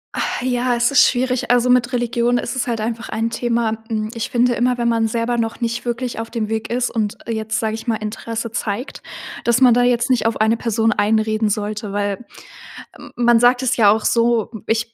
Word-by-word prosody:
Ah, - - -2
ja, 245 -1 +1
es 240 +2 +2
ist 275 - +6
schwierig. 255 0 -1
Also 245 0 +3
mit 250 0 +3
Religion 240 0 0
ist 240 - -3
es 255 - -2
halt 235 -2 -2
einfach 230 0 -4
ein 225 +1 -2
Thema. 230 -2 -1
Hm, 215 -1 -2
ich 230 +1 -4
finde 245 0 +2
immer, 245 +1 +1
wenn 235 -1 0
man 230 -1 +2
selber 235 +2 -1
noch 225 +1 -2
nicht 235 +1 -3
wirklich 240 -1 -3
auf 225 - -5
dem 220 -3 -3
Weg 220 0 -3
ist 245 +1 0
und 220 0 -2
jetzt 220 -1 -2
sage 220 -1 -1
ich 225 +2 -7
mal 225 - +1
Interesse 225 +2 -5
zeigt, 220 +2 -4 0.4
dass 235 +1 +2
man 250 -3 +6
da 245 - +3
jetzt 245 +1 +2
nicht 240 -2 +2
auf 225 - -2
eine 220 +1 +3
Person 225 -1 0
einreden 215 0 +1
sollte, 210 0 -3
weil 205 +2 -2 0.7
m - - -12
man 240 -1 +4
sagt 245 +2 +4
es 260 0 0
ja 215 -4 +6
auch 215 +1 +2
so, 230 -2 +1 0.2
ich 225 +1 -1
230 Hz, 215 wpm, -19 LUFS, 220-245 Hz, 0.7 s, ist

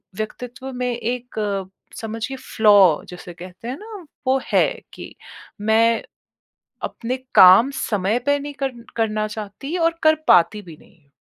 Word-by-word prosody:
व्यक्तित्व 245 +5 -6
में 250 0 -2
एक 220 -5 -3 0.3
समझिए 225 +4 -5
फ्लॉ 205 -9 +4
जिसे 180 0 -10
कहते 180 +5 -11
हैं 260 - -4
ना 430 - -12 0.4
वो 265 +1 +3
है - - +5 0.3
कि - - -10 0.5
मैं 225 +2 +3 0.8
अपने 250 +2 -4 0.2
काम 190 +9 +8
समय 210 +2 -1
पे 285 0 +3
नहीं 290 +1 -7
कर 270 -1 -1 0.2
करना 215 -2 0
चाहती 215 - -7
और 330 -1 +1
कर 315 0 +5
पाती 180 +5 +4
भी 170 -4 -12
नहीं। 155 -4 -24
225 Hz, 140 wpm, -21 LUFS, 200-255 Hz, 0.8 s, काम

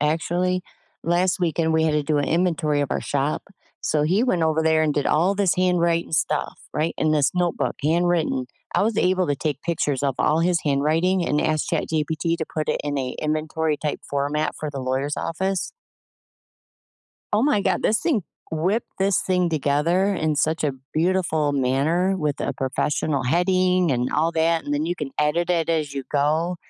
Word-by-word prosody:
actually. 175 +4 0 0.4
Last 180 +2 +1
weekend, 160 -1 +1
we 160 0 +3
had 155 - +2
to 150 -1 +1
do 150 0 0
an 145 - 0
inventory 160 -4 +1
of 140 - -4
our - - -1
shop. 145 +1 -1 0.4
So, 150 -1 0
he 185 +9 +2
went 185 -10 +1
over 160 0 +2
there 160 0 +3
and 150 -2 +2
did 145 - 0
all 180 +6 +2
this 195 -3 +2
handwriting 170 -2 +1
stuff, 150 -1 0
right, 155 +2 -1
in 155 0 +2
this 145 -2 +3
notebook, 175 -1 0
handwritten. 165 -4 +1 0.3
I - - +3
was 220 0 0
able 185 0 +2
to 145 -2 0
take 145 -2 -3
pictures 150 -5 -1
of 140 -2 +1
all 155 +2 +2
his 175 0 +2
handwriting 160 +6 +1
and 150 - +1
ask 155 -1 0
ChatGPT 160 +1 -1
to 160 - -1
put 155 -2 -2
it - - 0
in 145 -1 -1
a 130 -1 -2
inventory 155 0 -1
type 150 -2 -3
format 145 +2 -1
for 155 - -4
the 135 -2 -5
lawyer's 130 +3 -1
office. 190 +3 -2 1.6
Oh 210 +3 +3
my 280 -8 +3
god, - - 0
this 215 - +2
thing 255 - +1 0.3
whipped 185 +8 -1
this 195 0 +2
thing 180 -2 +1
together 165 +6 +1
in 155 -4 0
such 160 +2 +1
a 145 - +1 0.2
beautiful 160 -3 +1
manner, 145 +8 +1
with 150 -4 -2
a - - -1
professional 140 +1 -1
heading 180 +3 +2
and 125 0 0
all 160 +2 +2
that, 165 0 +1
and 145 - -3
then 150 +2 -1
you 175 - -1
can 145 -5 -5
edit 155 +4 +1
it 170 -2 +1
as 155 -4 0
you 135 -2 -4
go. 155 +5 +1
160 Hz, 185 wpm, -23 LUFS, 150-175 Hz, 1.6 s, we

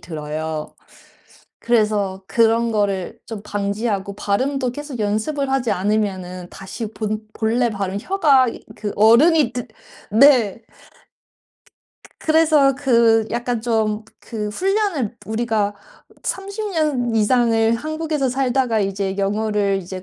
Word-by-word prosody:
들어요. 155 -1 -5 0.9
그래서 210 -5 +1
그런 230 +1 +2
거를 200 -3 -1
좀 220 -3 -6
방지하고 200 -1 -2
발음도 255 +6 -1
계속 290 -1 -7
연습을 265 +7 -1
하지 255 -4 0
않으면은 185 -3 -2
다시 195 +4 -6
본 215 0 -3
본래 235 +2 +1
발음 195 -2 -3
혀가 290 -10 +3 0.3
그 205 -1 -4
어른이든 245 +2 +4 0.5
네. 245 -7 +5
그 - - -33 1.5
그 - - -15
그래서 310 -4 +4
그 230 -5 +3
약간 240 -1 -2
좀 220 -2 0 0.2
그 215 -3 -5
훈련을 375 - -1
우리가 220 -2 -1 0.5
30 400 +2 -4
년 280 -8 0
이상을 225 0 +3
한국에서 310 0 -2
살다가 250 -3 +1
이제 195 0 -2
영어를 205 0 0
이제 185 +1 -8
225 Hz, 235 characters per minute, -20 LUFS, 205-265 Hz, 1.5 s, 네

